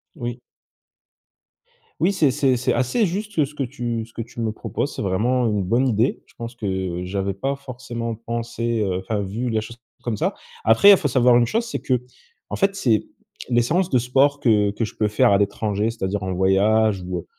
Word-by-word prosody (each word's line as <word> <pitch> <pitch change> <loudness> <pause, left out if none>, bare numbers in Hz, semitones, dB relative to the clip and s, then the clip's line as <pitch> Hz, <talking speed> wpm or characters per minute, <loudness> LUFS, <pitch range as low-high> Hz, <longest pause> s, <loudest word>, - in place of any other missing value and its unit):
Oui. 120 -4 -5 1.6
Oui 185 +5 +2
c'est 155 -7 +3
c'est 130 0 +2
c'est 120 - 0
assez 130 - +1
juste, 205 +1 -4
heu, 150 - +5
ce 150 +2 -13
que 140 - -1
tu 120 -3 -3
ce 115 - -21
que - - -5
tu 115 +1 -9
me 115 -1 0
proposes, 140 +5 -4
c'est - - -4
vraiment 115 +6 +1
une 105 -3 0
bonne 120 +8 +2
idée. 115 +2 +1
Je - - -25
pense 115 +1 -6
que 95 -5 -3
j'avais 100 +1 -2
pas 135 +8 -2
forcément 120 -3 -6
pensé, 115 0 -3
heu, 95 -2 0
enfin 105 +2 -2
vu 110 +6 -3
la 110 -1 0
chose 115 +2 -10 0.3
comme 120 -3 -1
ça. - - -1 0.3
Après 155 - +7
faut 160 - -1
savoir 125 -2 +4
une 120 - +3
chose, 230 - 0
c'est 230 - -4
que, 125 -2 0 0.5
en - - -1
fait 195 0 +1
c'est, 115 - +1 0.4
les 120 -1 +3
séances 175 +8 +1
de 130 - +3
sport 135 +4 +2
que 105 -6 +3
que 110 +3 -2
je 105 - -9
peux 105 - +1
faire 105 -1 +3
à 100 - +4
l'étranger, 105 +1 0
c'est-à-dire 105 -3 -3
en 95 -1 -3
voyage 100 +2 +3
ou, 90 0 -4
heu, 85 - -6
115 Hz, 210 wpm, -22 LUFS, 105-130 Hz, 1.6 s, Après